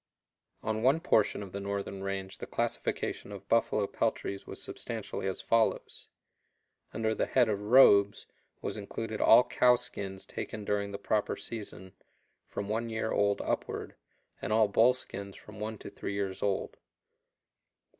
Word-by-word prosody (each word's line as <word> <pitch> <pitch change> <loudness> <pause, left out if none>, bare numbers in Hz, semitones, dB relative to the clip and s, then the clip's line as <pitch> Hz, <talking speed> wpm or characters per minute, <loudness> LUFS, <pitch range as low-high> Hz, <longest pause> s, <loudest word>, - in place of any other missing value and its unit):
On 110 0 -1
one 135 +6 +4
portion 110 - +2
of 95 - -9
the 100 - -4
northern 100 -1 -4
range 95 -1 -4
the - - -6
classification - - -2
of 100 -1 -9
buffalo 110 -2 +2
peltries 100 0 -2
was - - -7
substantially - - -5
as 95 - -3
follows: 115 -1 0 0.8
Under 110 -1 0
the - - -1
head 125 -3 +4
of 105 -2 -1
robes 105 -3 +6 0.4
was - - -3
included 110 +2 -4
all 120 +2 +8
cow 125 0 +4
skins 95 -5 -5
taken 105 -2 -6
during 100 0 0
the 100 - -5
proper 105 0 0
season, 100 -4 -7 0.5
from 100 - -5
one 115 +2 -1
year 110 0 -2
old 100 0 +2
upward, - - -3 0.5
and - - -3
all 110 0 +5
bull 115 +5 +5
skins 100 -5 -6
from 105 -1 -12
one 110 +1 -4
to - - -9
three - - -5
years 95 -2 -3
old. 100 -2 -1
105 Hz, 155 wpm, -30 LUFS, 100-110 Hz, 0.8 s, all